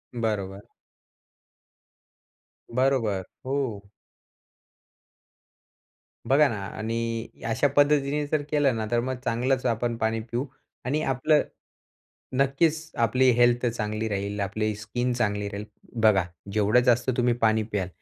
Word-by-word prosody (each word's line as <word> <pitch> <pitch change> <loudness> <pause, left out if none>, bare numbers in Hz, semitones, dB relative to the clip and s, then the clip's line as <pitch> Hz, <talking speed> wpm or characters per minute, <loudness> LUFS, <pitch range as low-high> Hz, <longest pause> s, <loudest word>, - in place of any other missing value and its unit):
बरोबर. 100 -4 -3 2.1
बरोबर. 125 -8 +1 0.2
हो. 125 -8 -3 2.4
बघा 145 +2 +5
ना 110 - -3
आणि 115 +1 -3 0.2
अशा 130 +5 +2
पद्धतीने 145 0 +3
जर 150 0 0
केलं 145 -5 +2
ना, 110 -1 -2
तर 120 - +3
मग 130 +1 -2
चांगलंच 125 +2 0
आपण 120 0 0
पाणी 110 0 0
पिऊ 125 +4 -1 0.4
आणि 150 +4 0
आपलं 140 +4 +2 1.0
नक्कीच 155 +4 +1
आपली 125 +3 +4
हेल्थ 120 +1 +3
चांगली 110 -1 -2
राहील, 100 +1 -3
आपली 105 +2 -1
स्किन 120 +4 -2
चांगली 105 -4 -1
राहील. 100 +1 -6 0.4
बघा, 100 -5 +4 0.3
जेवढं 105 +3 +4
जास्त 120 0 +3
तुम्ही 120 -1 +3
पाणी 110 0 +3
प्याल, 105 -4 -2
120 Hz, 115 wpm, -26 LUFS, 110-130 Hz, 2.4 s, बघा